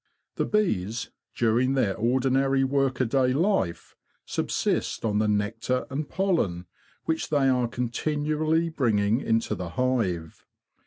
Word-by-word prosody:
The - - +1
bees, 115 - 0 0.2
during 120 +3 +2
their 105 -7 +1
ordinary 130 +3 +2
work 135 -1 +1
aday 130 +1 +1
life, 170 - 0 0.3
subsist - - -1
on 105 -1 +1
the 110 - +2
nectar 110 +5 0
and 145 +2 -3
pollen 165 - 0 0.4
which 160 0 -1
they 145 -3 +2
are 125 -2 +2
continually 155 +7 0
bringing 115 -7 +1
into 115 0 0
the 90 -2 -5
hive. 95 -7 -1
125 Hz, 120 wpm, -26 LUFS, 110-140 Hz, 0.4 s, during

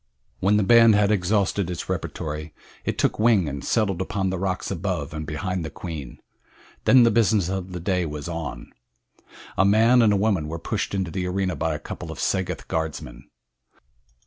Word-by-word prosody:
When 100 +3 +3
the 105 - +2
band 115 +1 +6
had 105 0 +3
exhausted 100 -1 +1
its 90 - -5
repertory 75 0 -4 0.3
it - - -2
took - - +1
wing 110 -6 +4
and 70 -1 -5
settled 100 -5 0
upon 95 0 -1
the 95 - -3
rocks 95 -1 -2
above 80 - -3
and 75 -1 -5
behind 90 +4 -3
the 80 - -4
queen. 75 -5 -7 0.7
Then 130 -2 +7
the 115 - +5
business 105 -4 +2
of 95 -1 -4
the 90 - -5
day 90 0 0
was 75 0 -6
on. 85 -3 -6 0.9
A - - +6
man 115 +5 +5
and 105 -3 +4
woman 100 -7 +1
were 80 +2 -4
pushed 85 - -3
into 95 -3 -2
the 90 0 -2
arena 95 0 -1
by 80 -1 -1
a - - -2
couple - - -7
of - - -8
Sagoth 90 -1 -2
guardsmen. 75 -6 -4
95 Hz, 180 wpm, -24 LUFS, 80-100 Hz, 0.9 s, Then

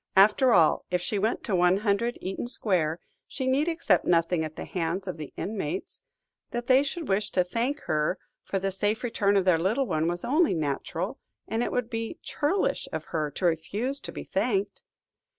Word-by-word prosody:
After 210 +6 +6
all, 165 -8 +4
if 180 - +1
she 200 +3 -2
went 220 +4 0
to 205 - 0
100, 200 +6 +2
Eaton 190 +5 -4
Square, 175 -9 0 0.3
she 265 - -4
need 270 +4 +2
accept 325 - +2
nothing 165 -1 +2
at 155 0 -6
the - - -6
hands 180 +2 -2
of 180 - -4
the 150 -2 -7
inmates: 220 - -4 0.5
that 240 -1 -4
they 260 +2 +6
should 290 +3 -4
wish 200 +2 +1
to 180 - +4
thank 240 +10 -2
her 155 +4 0 0.3
for 195 - -2
the 195 0 -1
safe 210 +5 -1
return 205 -4 +2
of 190 - +2
their 180 -3 +4
little 215 +11 +1
one 160 -7 0
was 175 +1 -2
only 310 - +3
natural, 160 - -2 0.3
and 225 +1 -1
it - - -1
would 250 -2 0
be 230 -1 -4
churlish 320 +7 0
of - - -4
her 155 -2 0
to 160 +6 -4
refuse 205 - 0
to - - -7
be - - -6
thanked. 200 -1 -1
200 Hz, 190 wpm, -27 LUFS, 175-240 Hz, 0.5 s, After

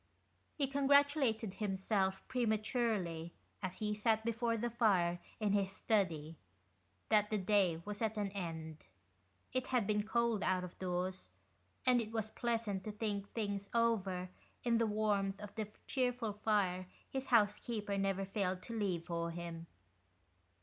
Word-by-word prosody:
He 285 - +1
congratulated 275 -6 +3
himself, 195 -1 0
prematurely, 215 -8 0 0.3
as 185 -2 -4
he 210 -1 -1
sat 220 +1 +1
before 230 0 +1
the 240 +2 -1
fire 190 -7 +3 0.2
in 210 -2 +1
his 195 -2 +2
study, 170 -7 0 0.7
that 210 -1 +4
the 215 - +1
day 185 -4 +2
was 205 +1 -5
at 220 -1 0
an 205 -2 -1
end. 160 -5 -5 0.7
It 255 0 0
had 250 -5 +2
been 210 0 +2
cold 230 0 +1
out 185 -1 +1
of 180 - -8
doors, 185 0 -2 0.6
and 250 -2 +5
it 220 -1 -6
was 220 -1 -2
pleasant 225 -5 -1
to 215 - -3
think 205 -2 -2
things 200 -3 -2
over 195 -6 +1 0.3
in 235 -1 +3
the 230 - +3
warmth 205 -2 +1
of 210 -1 -8
the 215 -2 -3 0.2
cheerful 245 -4 0
fire 200 -4 +1 0.2
his 265 0 -4
housekeeper 210 -2 +2
never 195 0 0
failed 190 -2 -1
to 230 - -6
leave 180 -5 0
for 170 -1 -2
him. 170 0 -6
210 Hz, 145 wpm, -36 LUFS, 185-230 Hz, 0.7 s, and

